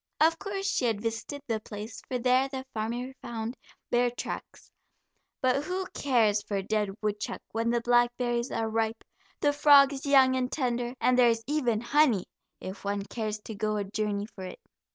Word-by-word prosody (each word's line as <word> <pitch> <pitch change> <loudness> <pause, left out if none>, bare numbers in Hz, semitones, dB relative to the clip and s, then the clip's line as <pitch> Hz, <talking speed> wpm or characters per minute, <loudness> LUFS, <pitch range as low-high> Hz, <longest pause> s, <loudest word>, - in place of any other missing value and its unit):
Of 325 +1 +4
course 390 -1 -4
she 255 - +1
had 225 -3 +1
visited 230 +6 -4
the 225 -4 -1
place, 215 +1 -8
for 255 - -1
there 255 +2 +3
the 265 -1 -5
farmer 235 +4 -3
found 235 0 -4 0.4
bear 245 0 +3
tracks, 240 - -7 0.7
but 260 +3 +2
who 370 +2 -2
cares 225 -7 +2
for 205 -1 -3
a 195 - -2
dead 210 0 0
woodchuck 210 0 -2
when 230 +1 0
the 235 0 +1
blackberries 240 0 +2
are 225 - -1
ripe, 225 0 -1 0.4
the 290 -1 +3
frogs 280 -1 +6
young 265 -2 +6
and 255 -1 -1
tender, 245 -3 -1
and 250 0 +3
there 240 -1 +7
is 230 -1 0
even 245 -7 0
honey, 240 -5 +3 0.3
if 190 +2 -8
one 200 0 -1
cares 215 -1 -3
to 220 - -7
go 215 +1 -1
a 205 - 0
journey 205 0 -2
for 200 -3 -11
it. 185 - -8
240 Hz, 180 wpm, -28 LUFS, 215-260 Hz, 0.7 s, there